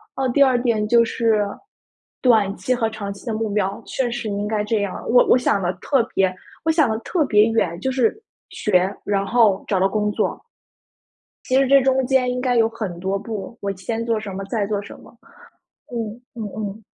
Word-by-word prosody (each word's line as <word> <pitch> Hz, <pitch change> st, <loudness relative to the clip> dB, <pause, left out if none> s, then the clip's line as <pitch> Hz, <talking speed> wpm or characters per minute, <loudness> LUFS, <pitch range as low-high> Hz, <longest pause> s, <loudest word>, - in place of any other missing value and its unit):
啊， 265 Hz, -1 st, 0 dB
第 280 Hz, -, +6 dB
二 250 Hz, -3 st, +3 dB
点 225 Hz, -4 st, +1 dB
就 235 Hz, 0 st, +5 dB
是， 220 Hz, -3 st, +1 dB, 0.8 s
短 220 Hz, -6 st, +3 dB
期 190 Hz, +8 st, 0 dB
和 225 Hz, -2 st, 0 dB
长 205 Hz, -2 st, -5 dB
期 195 Hz, -, -15 dB
的 225 Hz, -, -1 dB
目 220 Hz, 0 st, -2 dB
标， 200 Hz, +2 st, -1 dB
确 245 Hz, -3 st, -2 dB
实 240 Hz, -2 st, -4 dB
应 205 Hz, 0 st, -2 dB
该 215 Hz, -1 st, 0 dB
这 210 Hz, 0 st, 0 dB
样。 200 Hz, -2 st, -4 dB
我 245 Hz, +1 st, +6 dB
我 -, -, +6 dB
想 205 Hz, -5 st, +1 dB
得 175 Hz, 0 st, 0 dB
特 235 Hz, +7 st, +1 dB
别 190 Hz, -1 st, +2 dB, 0.3 s
我 320 Hz, -, +4 dB
想 310 Hz, -6 st, +3 dB
得 220 Hz, -, 0 dB
特 325 Hz, +5 st, 0 dB
别 210 Hz, -4 st, +5 dB
远， 215 Hz, -7 st, 0 dB
就 265 Hz, -, -1 dB
是 260 Hz, -, 0 dB, 0.3 s
学， 190 Hz, -1 st, +1 dB
然 200 Hz, -1 st, 0 dB
后 215 Hz, -3 st, +3 dB
找 190 Hz, -3 st, +1 dB
到 190 Hz, -, +3 dB
工 210 Hz, +1 st, 0 dB
作。 -, -, -2 dB, 1.0 s
其 255 Hz, -, +1 dB
实 270 Hz, 0 st, +4 dB
这 275 Hz, +1 st, +6 dB
中 265 Hz, -1 st, +2 dB
间 255 Hz, -2 st, +2 dB
应 250 Hz, -, -2 dB
该 250 Hz, -1 st, +1 dB
有 225 Hz, -1 st, +4 dB
很 210 Hz, -7 st, -6 dB
多 190 Hz, +2 st, -1 dB
步， 215 Hz, +1 st, -6 dB
我 200 Hz, -1 st, -2 dB
先 225 Hz, +5 st, -3 dB
做 225 Hz, -2 st, 0 dB
什 200 Hz, -3 st, -6 dB
么， 195 Hz, +1 st, -5 dB
再 205 Hz, 0 st, -2 dB
做 205 Hz, -1 st, -1 dB
什 -, -, -11 dB
么， -, -, -17 dB, 0.8 s
嗯， 230 Hz, 0 st, -4 dB
嗯 230 Hz, -, -6 dB
嗯。 210 Hz, 0 st, -5 dB
220 Hz, 225 characters per minute, -21 LUFS, 200-245 Hz, 1.0 s, 第